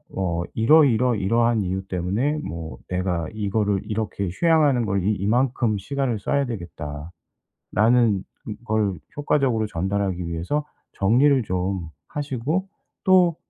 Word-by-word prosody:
어 85 -3 -1
'이러이러이러한 115 -4 +3
이유 95 +1 -2
때문에 100 - -1
뭐 80 -5 -6
내가 90 -2 -1
이거를 105 -1 0
이렇게 105 -2 -3
휴양하는 150 - +3
걸 100 -2 0
이 105 - +2
이만큼 115 +2 +1
시간을 130 +2 -2
써야 140 +7 0
되겠다.'라는 85 - -8 1.3
걸 110 -4 0 0.2
효과적으로 135 -7 +1
전달하기 95 0 -2
위해서 85 - -2 0.3
정리를 125 +6 +3
좀 95 -3 -2 0.2
하시고 145 +6 -2 0.3
또 180 -3 +5
105 Hz, 275 characters per minute, -23 LUFS, 95-130 Hz, 1.3 s, 또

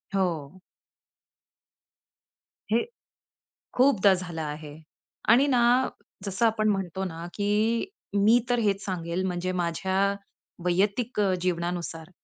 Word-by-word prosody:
हो. 175 -3 -2 2.1
हे 230 - +3 0.9
खूपदा 230 -7 +5
झालं 175 -3 -5
आहे. 150 0 -6 0.5
आणि 255 +5 +6
ना, 245 0 +4 0.4
जसं 200 +3 +1
आपण 215 -1 +1
म्हणतो 190 -2 -1
ना 165 -2 -6
की 215 - +1 0.3
मी 210 +4 +5
तर 245 - +3
हेच 205 -3 0
सांगेल 175 -1 -3
म्हणजे 180 0 -2
माझ्या 175 +3 -2 0.7
वैयक्तिक 205 +7 +1
अ, 195 -2 +2
जीवनानुसार 170 -1 -3
190 Hz, 105 wpm, -27 LUFS, 175-220 Hz, 2.1 s, आणि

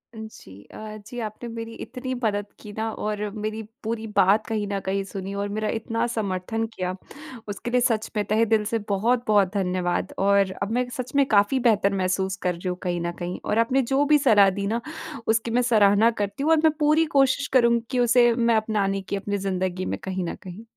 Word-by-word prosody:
जी। 220 - -10 0.2
अ, 215 0 -8
जी, 245 +2 -7
आपने 220 +1 -6
मेरी 230 0 -6
इतनी 255 +1 -5
मदद 205 -2 0
की 210 - -10
ना 220 +1 -1
और 210 0 -3 0.2
मेरी 215 +1 -3 0.2
पूरी 225 0 -3
बात 200 +3 +4
कहीं 215 -2 -2
न 200 - -1
कहीं 195 +1 -1
सुनी 195 0 -6
और 200 0 -3
मेरा 215 +1 -2
इतना 230 +1 -1
समर्थन 220 0 -2
किया। 185 0 -3 0.5
उसके 205 +4 -5
लिए 250 0 +3
सच 225 -2 +1
में 210 - +1
तहेदिल 220 +1 +2
से 225 +2 -1
बहुत-बहुत 210 -2 +2
धन्यवाद। 180 -3 -1
और 200 -1 +3
अब 200 - -2
मैं 245 +1 0
सच 255 0 -5
में 280 -1 +5
काफ़ी 205 +4 +3
बेहतर 210 -5 +3
महसूस 190 0 0
कर 180 - +1
रही 175 +2 -7
हूँ, 180 - -3
कहीं 175 -1 -1
न 170 0 -2
कहीं। 175 0 -4
और 215 - +1
आपने 255 +4 +3
जो 275 +2 +4
भी 300 +1 +5
सलाह 210 -9 +5
दी 200 - -1
ना, 230 +3 -1 0.5
उसकी 225 +1 +1
मैं 245 +2 +3
सराहना 220 -1 +4
करती 200 +6 -3
हूँ 315 - +2
और 325 - +6
मैं 315 - +6
पूरी 305 +2 +4
कोशिश 270 +1 +3
करूँगी 235 -2 +4
कि 255 - 0
उसे 240 0 +5
मैं 235 -1 +2
अपनाने 205 -3 0
की 195 - -4
अपनी 205 +1 -2
ज़िंदगी 185 -1 -2
में - - -3
कहीं 190 -1 -3
न - - -4
कहीं 185 +4 -9
215 Hz, 210 wpm, -24 LUFS, 195-235 Hz, 0.5 s, और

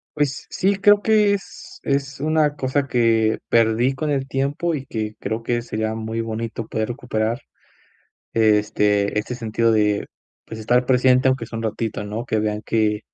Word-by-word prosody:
Pues 145 -2 -1
sí, 195 +2 +1
creo 205 +1 +5
que 210 -1 +3
es 290 +9 -9
es 140 0 -1
una 150 0 +1
cosa, 135 +1 -1
que 115 -3 +2
perdí 115 +3 +3
con 150 +2 -2
el 135 -2 -1
tiempo, 140 +5 -1
y 135 -2 -4
que 110 -1 -4
creo, 110 +1 -3
que 120 0 0
sería 110 -1 -3
muy 110 +1 -4
bonito, 115 0 -4
poder 110 0 -2
recuperar, 120 -2 -2 0.9
este 105 -2 +2
este 115 +4 -3
sentido 115 -1 0
de, 105 -1 +1 0.4
pues, 110 - -8
estar 125 +3 +1
presente, 130 0 +4
aunque 130 -3 0
sea 115 0 -7
un - - -4
ratito, 110 -1 -3
¿no? 110 +3 -4
Que 110 - -1
vean 105 0 -2
que, 105 -2 +1
115 Hz, 170 wpm, -22 LUFS, 110-140 Hz, 0.9 s, creo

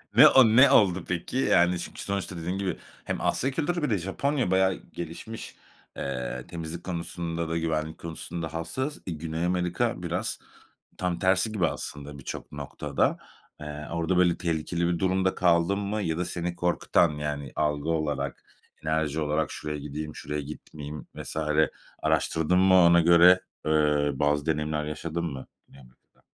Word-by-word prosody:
Ne - - +10
o 130 -2 +7
ne 115 +5 +6
oldu 95 -5 +4
peki? 90 +7 -3
Yani, 90 -8 +3
çünkü - - -7
sonuçta 100 -2 -3
dediğin 85 +3 -3
gibi 95 -1 -2 0.3
hem - - -3
Asya 135 - +1
Kültürü 165 +4 -1
bir 150 - +1
de 105 - +2
Japonya 110 - -1
bayağı 95 0 +4
gelişmiş. 85 +6 -8 0.4
Eee, 65 +1 -4
temizlik 85 0 -6
konusunda 85 -2 -3
da 80 - -1
güvenlik 80 -1 -2
konusunda 80 -1 -6
hassas. 130 - -3
Eee, 90 - -3
Güney 80 +1 -3
Amerika 90 -1 0
biraz - - -2 0.6
tam 90 -2 -1
tersi 95 +4 +2
gibi 95 -6 +2
aslında 75 -2 -6
birçok 70 - -7
noktada. 75 -2 -1 0.4
Eee, 75 0 -7
orada, 85 +2 0
böyle, 90 -1 +4
tehlikeli 85 0 -1
bir 85 -1 0
durumda 95 +1 +1
kaldın 85 +2 +3
mı 105 +1 -2
ya 80 -3 -1
da 90 - 0
seni 85 0 -3
korkutan, 85 -1 +2
yani, 75 -3 -4
algı 75 0 0
olarak, 75 -3 -2 0.4
enerji 80 -1 0
olarak 75 +1 0
"Şuraya 75 -1 -5
gideyim, 75 +1 -6
şuraya 75 0 -4
gitmeyeyim." 75 0 -8
vs. - - -6 0.7
araştırdın 80 +3 +2
mı 95 0 +5
ona 85 -1 +7
göre, 85 +2 +7 0.3
ııı, 75 -2 +2
bazı 75 0 +1
deneyimler 75 -1 0
yaşadın 80 +2 -4
mı 70 -5 -5 0.2
Güney 70 - -16
Amerika'da? 60 -1 -23
85 Hz, 155 wpm, -27 LUFS, 75-90 Hz, 0.7 s, Ne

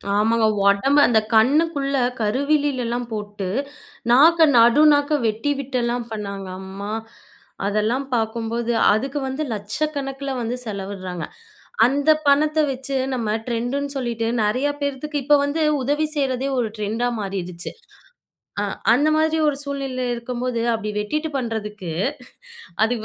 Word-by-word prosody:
ஆமாங்க. 220 +2 +3 0.2
ஒடம்ப 265 +9 +3
அந்த 225 -2 +4 0.2
கண்ணுக்குள்ள 280 +3 +3 0.3
கருவிலிலலா 260 +1 0 0.2
போட்டு, 205 -2 -5 0.6
நாக்க 320 +6 +7
நடு 235 +5 +6
நாக்க 290 +1 +1
வெட்டி 225 +7 -1
விட்டெல்லாம் 245 -3 -2
பண்ணாங்க. 200 -3 -5
அம்மா! 195 +2 -7 0.7
அதெல்லாம் 215 +6 0
பாக்கும்போது 230 +1 -1 0.2
அதுக்கு 270 +7 -1
வந்து 265 +4 -3
1,00,000கணக்கில 270 +5 -3
வந்து 235 +2 -2
செலவிடுறாங்க. 195 -4 -5 0.6
அந்த 285 +4 +2 0.2
பணத்த 300 +2 +3
வச்சு 270 +1 -4 0.2
நம்ம 220 -3 -1
ட்ரெண்டுன்னு 245 +4 -2
சொல்லிட்டு 235 -3 -2 0.2
நெறையா 250 +7 +1
பேர்த்துக்கு 285 +1 -2
இப்ப 295 0 +5
வந்து 290 +3 -1 0.2
உதவி 295 +4 +1
செய்றதே 270 -1 0
ஒரு 235 - +1
ட்ரெண்டா 220 +4 -1
மாறிடுச்சு. 180 -3 -5 0.9
அ - - 0 0.3
அந்த 290 +5 +3
மாதிரி 315 0 +2
ஒரு 290 - +1
சூழ்நிலையில 275 -2 -3
இருக்கும்போது 240 0 -3
அப்படி 215 -1 -3
வெட்டிட்டு 305 +10 -2
பண்ணுறதுக்கு. 210 -7 -4 0.9
அதுக்கு 225 0 +1
245 Hz, 115 wpm, -22 LUFS, 215-280 Hz, 0.9 s, நாக்க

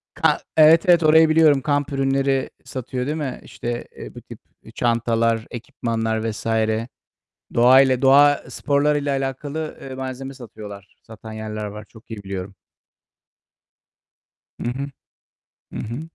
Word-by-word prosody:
Ka - - +2 0.2
Evet, 155 +1 +7
evet 170 -2 +6
orayı 160 +1 +6
biliyorum. 155 -3 +5
Kamp 145 0 -1
ürünleri 135 0 0 0.2
satıyor 125 0 -5
değil 150 +3 -2
mi? 140 -4 -4
İşte, 120 0 -5
eee, - - -9
bu - - -9
tip, - - -12 0.2
eee, - - -14
çantalar, 115 -1 0
ekipmanlar 115 -3 -3
vs. 105 - -9 1.1
Doğa 125 +3 +7
ile 130 -1 +2
doğa 145 +2 +5
sporlarıyla 145 0 0
alakalı, 140 +3 -4
eee, 135 -1 -8
malzeme 130 +1 -6
satıyorlar. 105 -5 -11
Satan 110 0 -11
yerler 110 -1 -5
var. 105 +1 -7
Çok 110 0 -18
iyi 110 -2 -7
biliyorum. 95 0 -6 2.1
Hı 120 - -2
hı. 140 +2 -5 0.8
Hı - - -6
hı. 115 +5 -5
130 Hz, 135 wpm, -22 LUFS, 115-145 Hz, 2.1 s, Evet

